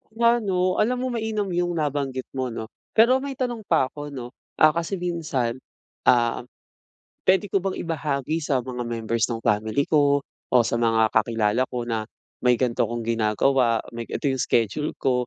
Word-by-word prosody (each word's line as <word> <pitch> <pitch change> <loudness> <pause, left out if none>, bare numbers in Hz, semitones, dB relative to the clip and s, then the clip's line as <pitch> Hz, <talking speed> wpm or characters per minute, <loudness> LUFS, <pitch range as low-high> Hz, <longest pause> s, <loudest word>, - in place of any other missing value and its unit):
Nga 235 +1 +4
'no, 185 -1 +1
alam 245 +4 +2
mo 255 - -1
mainam 220 -3 -2
yung 175 0 0
nabanggit 140 -4 -1
mo 130 -1 -2
'no. 115 -1 -6 0.2
Pero 235 +4 +6
may 275 0 -5
tanong 240 -4 -3
pa 130 - +2
ako 145 0 -7
'no. 130 -4 -7 0.2
Ah, 155 - +6
kasi 170 +4 -2
minsan, 155 -9 -2 0.5
ah, 120 -1 +4 0.9
pwede 190 +2 +4
ko 195 - +3
bang 190 0 -3
ibahagi 155 -1 -2
sa 135 -5 0
mga 125 -1 -4
members 115 -1 -1
ng 115 -2 -4
family 110 +6 +1
ko 145 -2 +3 0.2
o 125 - +3
sa 115 +1 -1
mga 110 -1 +3
kakilala 110 +1 +2
ko 120 -1 -3
na 110 -2 -3 0.3
may 125 -1 +4
ganito 120 -2 +1
akong 120 +1 -4
ginagawa? 115 +2 +2
May 115 0 -6
ga - - -6
ito 140 - 0
yung 130 - -1
schedule 120 +5 0
ko, 125 -2 0
135 Hz, 175 wpm, -24 LUFS, 115-175 Hz, 0.9 s, Pero